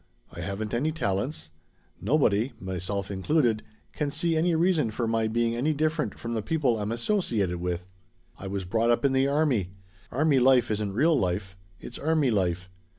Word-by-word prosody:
I 85 - -8
haven't 100 +5 -4
any 140 +7 +1
talents. 100 - -2 0.5
Nobody 120 - +2
myself 95 +2 -3
included 110 - +1 0.3
can 150 -2 -1
see 165 +3 -1
any 165 +1 +2
reason 165 -6 +2
for 115 +2 -2
my 115 0 +1
being 115 +1 0
any 145 +6 +1
different 155 +1 -1
from 115 0 -5
the 110 - -1
people 130 -3 0
I'm 105 +1 -2
associated 115 - 0
with. 90 0 -3 0.5
I 95 - -8
was 95 -1 -3
brought 115 +6 +1
up 120 +4 +2
in 140 - +4
the 135 +1 +3
army. 140 - +1 0.4
Army 145 -1 +3
life 125 -2 +4
isn't 105 -2 -1
real 155 +9 +3
life. 95 -3 -1 0.2
It's 120 - -9
army 155 -4 +2
life. 90 -3 0
115 Hz, 170 wpm, -27 LUFS, 100-150 Hz, 0.5 s, in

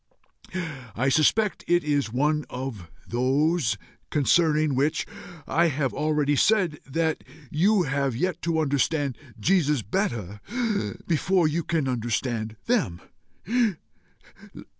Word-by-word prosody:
I 130 +3 +1
suspect 190 - +2
it 175 0 +3
is 145 -5 0
one 150 +5 +1
of 125 -9 -6 0.2
those 135 +1 +1 0.3
concerning 155 0 +3
which 140 +4 +1 0.4
I 170 +2 +3
have 140 -3 -1
already 150 -1 +1
said 185 -3 +2
that 160 +3 -1 0.3
you 190 +5 +3
have 135 -3 0
yet 180 +7 -1
to 165 -1 0
understand 145 -2 +1 0.2
Jesus 150 - +2
better 105 - -2 0.6
before 175 +1 +2
you 165 +2 -1
can 160 -5 0
understand 115 -2 -2
them. 190 - +1
150 Hz, 105 wpm, -26 LUFS, 130-165 Hz, 0.6 s, it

